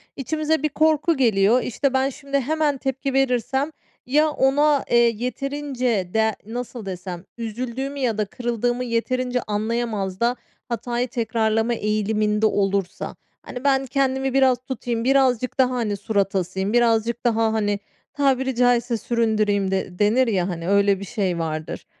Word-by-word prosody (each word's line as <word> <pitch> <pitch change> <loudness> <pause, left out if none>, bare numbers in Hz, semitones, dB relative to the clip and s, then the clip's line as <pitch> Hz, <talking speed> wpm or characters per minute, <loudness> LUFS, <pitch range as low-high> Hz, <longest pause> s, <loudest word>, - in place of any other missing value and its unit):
içimize 310 +2 -1
bir 305 - +2
korku 310 +1 +2
geliyor. 225 -1 +3
İşte, 270 +3 -1
ben 265 +1 +2
şimdi 275 +1 -2
hemen 300 0 0
tepki 270 +1 -3
verirsem 270 +2 +1 0.3
ya 300 +4 +3
ona, 290 0 +2
eee, 240 - +5
yeterince 250 -3 0
de 220 -1 +2
nasıl 235 0 -6
desem, 180 -2 -6
üzüldüğümü 250 +5 -4
ya 235 -5 0
da 210 - +1
kırıldığımı 240 +2 -2
yeterince 250 +1 -1
anlayamaz 210 -3 -2
da 240 +1 +2 0.3
hatayı 240 +1 -2
tekrarlama 225 -1 0
eğiliminde 215 0 0
olursa. 195 -3 -1 0.3
Hani, 250 +1 -7
"Ben 270 -1 +2
kendimi 265 0 0
biraz 265 -2 +4
tutayım, 235 -2 -3
birazcık 255 -2 +2
daha, 255 -1 +5
hani, 210 -4 -1
surat 200 -1 -1
asayım, 190 +2 -1
birazcık 235 0 +2
daha, 225 -1 +2
hani, 205 -2 0 0.3
tabiri 265 -2 +1
caizse, 245 -1 +2
süründüreyim" 215 -5 +1
de 190 -2 -3
denir, 230 +5 +3
ya, 190 -4 0
hani, 170 0 -4
öyle 200 -1 +3
bir 200 - -6
şey 190 -5 -2
vardır. 155 -1 -4
235 Hz, 140 wpm, -23 LUFS, 210-265 Hz, 0.3 s, eee